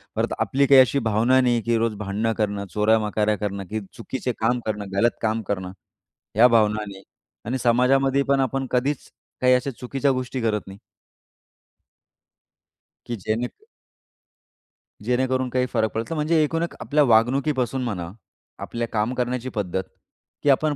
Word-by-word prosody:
परत - - 0
आपली 140 +1 +2
काही 135 -1 +8
अशी 135 +2 +2
भावना 115 +5 +3
नाही, 120 -2 +2
की 115 +1 +1
रोज 115 -1 0
भांडणं 105 +2 -2
करणं, 100 -2 -1
चोऱ्या-मकाऱ्या 105 0 +2
करणं 100 -1 -3
की 110 - -2 0.2
चुकीचे 125 +1 -4
काम 120 +2 +1
करणं, 105 -2 -4
गलत 120 +4 +2
काम 110 0 0
करणं. 95 -2 -3 0.7
या 120 +3 +8
भावना 110 -3 +2
नाही 95 -1 -10 0.4
आणि 125 +4 -1
समाजामध्ये 135 +3 +3
पण 140 0 +3
आपण 135 +1 -1
कधीच 130 +3 -1 0.3
काही 125 0 +5
अशा 125 +2 -1
चुकीच्या 135 +2 0
गोष्टी 130 0 -3
करत 110 -2 0
नाही. 95 +1 -11 2.3
की 120 - -4
जेणे 115 +3 0 1.6
जेणेकरून 130 +1 0
काही 125 0 +1
फरक 110 -1 +1
पडल. 115 +8 -3
म्हणजे 155 +1 +2
एकूण 165 +2 -1
एक 170 - -4
आपल्या 150 0 +2
वागणुकीपासून 130 +2 +2
म्हणा, 90 -8 -3 0.5
आपल्या 115 0 -4
काम 110 +3 0
करण्याची 125 0 -2
पद्धत 95 -2 -2 0.6
की 145 - +3
आपण 145 +2 +3
120 Hz, 145 wpm, -23 LUFS, 110-130 Hz, 2.3 s, काही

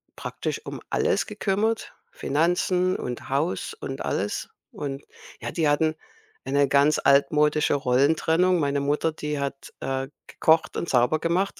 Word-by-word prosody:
praktisch - - -4
um - - -7
alles - - +1
gekümmert, 220 +3 -1 0.2
Finanzen 180 +4 +1
und 125 -1 -5
Haus 140 +6 -1
und 135 0 -6
alles. 100 +2 -2 0.2
Und, 140 -1 -5 0.4
ja, - - -4
die 160 -3 0
hatten 155 +2 +2 0.5
eine 140 +1 +2
ganz 140 +2 +3
altmodische 150 +2 +3
Rollentrennung. 160 +7 +2
Meine 140 -2 0
Mutter, 145 +3 0
die 150 -1 -4
hat, 140 0 -5
äh, 135 0 -2 0.2
gekocht 160 0 +2
und 170 - -3
sauber 125 +5 +3
gemacht. 180 +5 0
150 Hz, 135 wpm, -25 LUFS, 140-165 Hz, 0.5 s, ganz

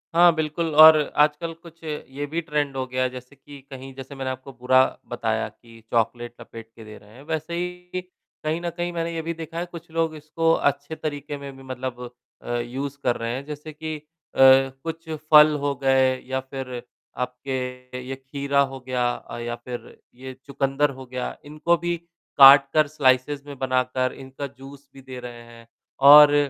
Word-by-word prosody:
हाँ, 175 0 +7
बिल्कुल, 160 +1 -2
और 155 0 +10 0.2
आजकल 150 +3 +2
कुछ 165 0 -15
ये 145 -2 -5
भी 170 +2 -2
ट्रेंड 145 -3 -2
हो 130 - -1
गया, 130 0 0
जैसे 125 +2 -10
कि 140 +1 -13
कहीं 135 0 -9
जैसे 135 +1 -9
मैंने 130 -1 -3
आपको 130 +1 -9
बुरा 130 +1 +4 0.3
बताया - - -1
कि 115 -1 -18
चॉकलेट 120 +1 0
लपेट 115 -1 -11
के 115 - -12
दे 110 0 -11
रहे 105 0 -18
हैं। 135 - -13
वैसे 160 +1 -4
ही, 180 +1 -4 0.4
कहीं 160 +2 -1
न 175 - -2
कहीं, 175 +1 -4
मैंने 170 0 -2
ये 165 - -2
भी 165 +1 -3
देखा 165 +1 -7
है, 175 - -2
कुछ 170 -1 -11
लोग 165 -1 0
इसको 165 +2 0 0.2
अच्छे 145 +3 -7
तरीके 145 -1 -5
में 140 -1 -9
भी 135 - -13
मतलब 125 -1 -6 0.3
अ, - - -10
यूज़ 135 +4 -4
कर 120 -1 +2
रहे 115 0 -3
हैं। 135 +2 -6
जैसे 150 +1 -8
कि 155 +1 -5
अ, - - -13 0.4
कुछ 135 +5 +4 0.2
फल 150 0 +8
हो 140 0 0
गए 130 -1 +3
या 130 0 -1
फिर 130 -2 -6 0.4
आपके 125 0 -5
ये 135 - -4
खीरा 140 +1 -2
हो 135 - -7
गया 125 -1 +1
अ, - - -9
या 120 0 -4
फिर 120 0 -9 0.2
ये 130 +1 -9
चुकंदर 140 +1 0
हो 130 - -9
गया, 125 0 -5
इनको 155 +3 +1
भी 175 +1 -1 0.4
काटकर, 140 +2 +8
स्लाइसेस 140 0 +1
में 140 -2 -9
बनाकर, 130 0 0
इनका 135 +1 -7
जूस 140 +1 -14
भी 135 - -13
दे 130 -1 -9
रहे 120 -1 -9
हैं, 115 0 -15 0.3
और 145 +1 +9
135 Hz, 185 wpm, -24 LUFS, 130-155 Hz, 0.4 s, और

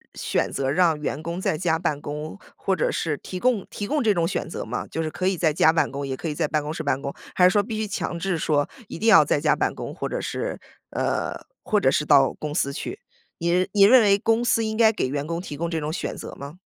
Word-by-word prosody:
选 - - -1
择 135 -1 -1
让 165 -1 +3
员 150 0 -3
工 170 +2 -4
在 175 - 0
家 165 -1 +1
办 150 -3 -2
公， 150 +6 -6 0.2
或 190 - -1
者 - - 0
是 155 -3 -1
提 185 - -7
供 240 -3 +1
提 205 - -5
供 300 0 0
这 215 - +4
种 170 -3 +1
选 170 - -3
择 - - -5
吗？ - - -4
就 160 - -3
是 155 - -2
可 185 - -2
以 190 -2 +1
在 160 -3 +2
家 160 - +5
办 165 - +1
公， 140 0 -4
也 130 -1 -3
可 - - -5
以 155 - -2
在 155 0 -1
办 150 0 0
公 150 +1 -4
室 165 - -4
办 140 -2 0
公， 140 0 -5 0.2
还 180 - +3
是 180 - +7
说 205 +1 +3
必 220 +1 -5
须 215 -1 -2
强 185 -3 -3
制 180 0 -1
说 145 -2 +1 0.2
一 - - -7
定 220 - -1
要 205 -8 +8
在 145 - +1
家 150 - +3
办 - - 0
公， - - -6
或 - - -4
者 - - -3
是 - - -4 0.3
呃， - - -1 0.3
或 210 - +2
者 130 - +3
是 150 - +1
到 140 -3 +5
公 150 -1 -5
司 140 -5 0
去， - - -5 0.4
你 175 +2 +1
你 200 - +5
认 240 +5 +8
为 200 -2 +4
公 225 +2 +1
司 230 -1 +2
应 220 0 -2
该 225 -1 +5
给 205 - -1
员 140 +2 -3
工 165 +1 -2
提 175 -5 -7
供 170 +3 -3
这 165 -1 -1
种 150 +1 -3
选 - - -4
择 - - -8
吗？ 140 +4 -8
165 Hz, 295 characters per minute, -24 LUFS, 150-195 Hz, 0.4 s, 要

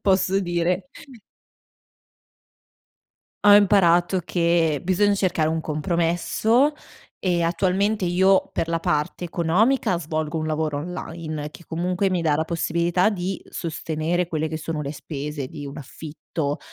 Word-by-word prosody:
posso 190 0 +2
dire 175 +1 -1 2.6
Ho 205 0 +9
imparato 185 -3 +4
che 170 -4 +1
bisogna 200 +3 +2
cercare 180 -5 +1
un 160 0 -1
compromesso. 175 - +1 0.5
E 175 -2 +1
attualmente 190 +4 +1
io, 190 +2 +3
per 165 - -2
la 165 0 0
parte 150 +3 -1
economica 185 +5 +1
svolgo 155 -1 -3
un 155 - -2
lavoro 155 -2 -1
online, 155 -2 -5
che 170 - -14
comunque 180 +4 -1
mi 180 -2 0
dà 155 -3 +2
la 160 - 0
possibilità 170 +3 +1
di 190 -2 -3
sostenere 165 +1 -2
quelle 160 -2 -1
che 155 - -4
sono 155 -1 -4
le 140 0 -4
spese 145 -2 -5
di 145 0 -8
un 140 - -8
affitto, 150 +1 -5
170 Hz, 130 wpm, -23 LUFS, 155-185 Hz, 2.6 s, Ho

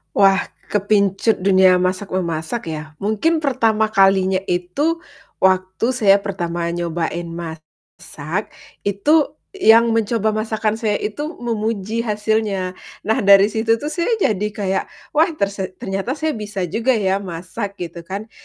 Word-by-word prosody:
Wah 195 -1 +5 0.2
kepincut 205 +1 +1
dunia 185 -1 +5
masak-memasak 185 0 -2
ya? 155 -2 -4 0.2
Mungkin 220 +11 +1
pertama 225 -7 +2
kalinya 195 -2 +3
itu 195 - -1 0.4
waktu 185 +2 +2
saya 200 -5 +5
pertama 175 -4 -3
nyobain 170 0 -3
masak, 160 +1 -7 0.3
itu 285 +11 +2 0.2
yang 230 - +5
mencoba 225 -1 +1
masakan 215 0 -1
saya 215 -3 0
itu 220 +10 -3
memuji 225 -2 -2
hasilnya. 210 -3 0 0.3
Nah 220 - +1
dari 200 +1 +6
situ 225 +1 +2
tuh 295 +7 -5
saya 340 0 -1
jadi 210 - 0
kayak, 200 -2 -2 0.3
"Wah, 315 +3 +4
terse 195 -3 -3
ternyata 195 +7 -3
saya 315 +1 -1
bisa 210 -6 -4
juga 230 +9 +1
ya 195 -2 +1
masak." 195 +3 -6
Gitu 175 -3 -7
kan. 205 +4 -6
200 Hz, 125 wpm, -20 LUFS, 185-225 Hz, 0.4 s, dari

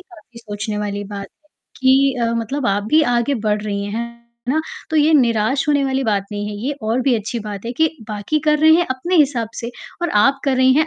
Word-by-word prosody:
काफ़ी 335 -10 -16
सोचने 210 -1 -5
वाली 205 -1 -3
बात 200 0 -6
है - - -60 0.4
कि 265 +1 +4
अ, - - +3
मतलब 240 +4 -2
आप 200 +1 +1
भी 310 - +6
आगे 240 +3 +1
बढ़ 210 -2 -1
रही 200 -1 -3
हैं, 205 - -5 0.6
है - - +2
ना? 315 - +2 0.3
तो 315 - 0
ये 310 +1 +4
निराश 250 +2 +2
होने 285 -2 +3
वाली 265 0 0
बात 205 -3 0
नहीं 205 0 -3
है। 210 - -5
ये 290 - 0
और 225 +3 0
भी 255 -1 +3
अच्छी 220 +2 -4
बात 205 -1 -6
है 235 - -3
कि 320 +5 +2 0.2
बाकी 210 +8 -1
कर 300 0 +4
रहे 315 +1 +5
हैं 345 +1 +3
अपने 340 +8 -1
हिसाब 265 -7 +2
से 235 +1 -5 0.3
और 345 - 0
आप 275 0 +3
कर 270 -2 +1
रही 260 0 +5
हैं 310 +2 +3
245 Hz, 240 wpm, -19 LUFS, 210-285 Hz, 0.6 s, भी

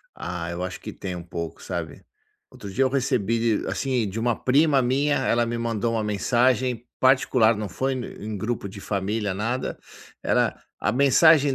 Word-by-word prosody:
Ah, 85 -2 -4
eu 85 +1 -4
acho 95 0 -4
que - - -7
tem 90 -2 -5
um 85 - -6
pouco, 85 -2 -6
sabe. - - -5 0.5
Outro 100 - -9
dia 135 +7 +2
eu 130 - +3
recebi 115 -4 +1
de - - -6
assim, 120 +3 0
de 110 +4 -4
um - - -2
prima 140 +1 +3
minha, 140 +4 +2
ela 120 0 +2
me 120 0 -2
mandou 115 0 -1
uma 110 -1 0
mensagem 120 +3 +1
particular, 130 -4 +4
não 105 -1 -4
foi 130 +9 -1
e 120 -4 -6
em 110 -1 -4
grupo 110 0 -3
de 100 - -10
família, 100 +1 -2
nada, 115 +6 -2 0.4
era - - +1 0.2
a 105 - 0
mensagem 140 +2 +5
115 Hz, 180 wpm, -24 LUFS, 100-130 Hz, 0.5 s, mensagem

